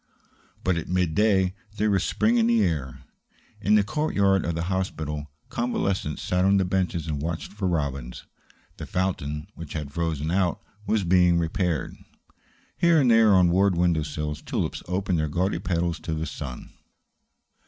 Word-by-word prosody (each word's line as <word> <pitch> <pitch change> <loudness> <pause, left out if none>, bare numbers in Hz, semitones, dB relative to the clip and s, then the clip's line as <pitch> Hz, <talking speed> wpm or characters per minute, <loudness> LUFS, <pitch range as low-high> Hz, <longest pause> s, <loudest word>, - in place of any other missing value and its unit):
But 95 -2 +1
at 80 - -5
mid 90 -3 +1
day 95 -3 +3 0.2
there 105 0 +2
was 100 - +2
spring 230 +2 +2
in 225 - +3
the 235 -1 +3
air. 70 -6 -2 0.6
In 105 +3 +4
the 105 - +5
courtyard 100 -7 +1
of 85 - -1
the 85 - -2
hospital, 80 -5 -3 0.2
convalescents 100 -9 -2
sat 90 0 +1
on 100 +1 +4
the 95 - +2
benches 90 -3 -1
and 75 -3 -3
watched 80 +4 -4
for 100 -2 -2
robins. 70 -7 -3 0.5
The - - -7
fountain, 75 -5 -2
which 80 -3 -9
had 75 -3 -4
frozen 80 -2 -1
out, 90 -2 +1 0.3
was 110 -2 +1
being 90 -1 +4
repaired. 85 -2 -1 0.8
Here 170 -2 +5
and 130 -4 +4
there 115 -2 +6
on 90 -2 +5
ward 95 0 +3
window 85 -2 +2
sills 75 0 -4
tulips - - -3
opened 90 -1 0
their 75 -1 0
gaudy 90 +3 0
petals 85 -2 -1
to 80 - -4
the 80 +1 -3
sun. 70 -6 -7
90 Hz, 165 wpm, -25 LUFS, 80-95 Hz, 0.8 s, there